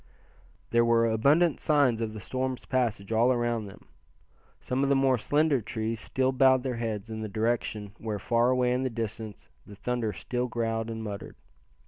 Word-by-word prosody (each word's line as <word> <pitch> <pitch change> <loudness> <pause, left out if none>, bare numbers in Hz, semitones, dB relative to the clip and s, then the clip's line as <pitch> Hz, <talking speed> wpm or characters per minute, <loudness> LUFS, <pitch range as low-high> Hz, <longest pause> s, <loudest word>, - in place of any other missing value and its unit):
There 120 0 +4
were 115 0 +4
abundant 140 +9 +3
signs 140 -7 +2
of 110 -1 -2
the - - -6
storm's 130 +4 -3
passage 115 -6 -1
all 115 +3 +4
around 120 -3 0
them. 95 - -13 0.7
Some 130 +1 -2
of 140 - +2
the 140 - +4
more 135 -2 +3
slender 145 +3 +2
trees 110 +1 -3
still 130 +2 0
bowed 130 -1 +4
their 130 -3 -2
heads 110 -2 -4
in 110 0 -5
the 110 - -4
direction 110 -1 -1
where, 110 -2 -3
far 115 +4 +2
away 125 -1 +2
in 125 - 0
the 130 - 0
distance, 110 -2 -6 0.2
the 105 - -12
thunder 120 0 -2
still 125 +3 -3
growled 115 -1 -2
and 110 0 -5
muttered. 100 -2 -6
115 Hz, 180 wpm, -28 LUFS, 110-130 Hz, 0.7 s, There